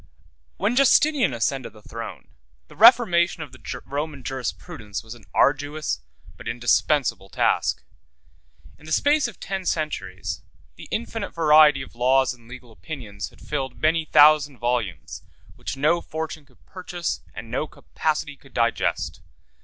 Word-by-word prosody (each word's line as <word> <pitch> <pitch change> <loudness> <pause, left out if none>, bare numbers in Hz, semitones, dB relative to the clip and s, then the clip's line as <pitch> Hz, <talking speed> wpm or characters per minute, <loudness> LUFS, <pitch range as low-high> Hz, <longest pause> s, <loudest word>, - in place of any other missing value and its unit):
When 235 - 0
Justinian 275 - +4
ascended 120 +1 -2
the 110 - -16
throne, 110 - -8 0.4
the - - -14
reformation 180 -7 +5
of 145 - -11
the - - -7
Roman 145 -1 -4
jurisprudence 115 -5 -5
was 110 0 -9
an 120 -4 -16
arduous 145 - +1 0.4
but - - -10
indispensable 120 -2 +1
task. - - +1 1.0
In 155 - -15
the - - -7
space 290 - +3
of 235 - -11
ten 195 -1 -4
centuries, 95 - -3 0.3
the - - -11
infinite 225 -2 -4
variety 150 -3 +6
of - - -13
laws 130 +2 +3
and 120 -2 -18
legal 125 -1 -11
opinions 110 - -7
had - - -21
filled 135 -3 -3
many 160 +1 +2
thousand 150 -2 +5
volumes, 120 - -2 0.3
which - - -6
no 155 +5 +2
fortune 160 -2 -6
could 130 - -27
purchase 175 -3 -4
and 115 +1 -8
no 150 +5 -1
capacity 150 0 -3
could 140 -1 -21
digest. 115 -1 0
145 Hz, 140 wpm, -24 LUFS, 120-160 Hz, 1.0 s, variety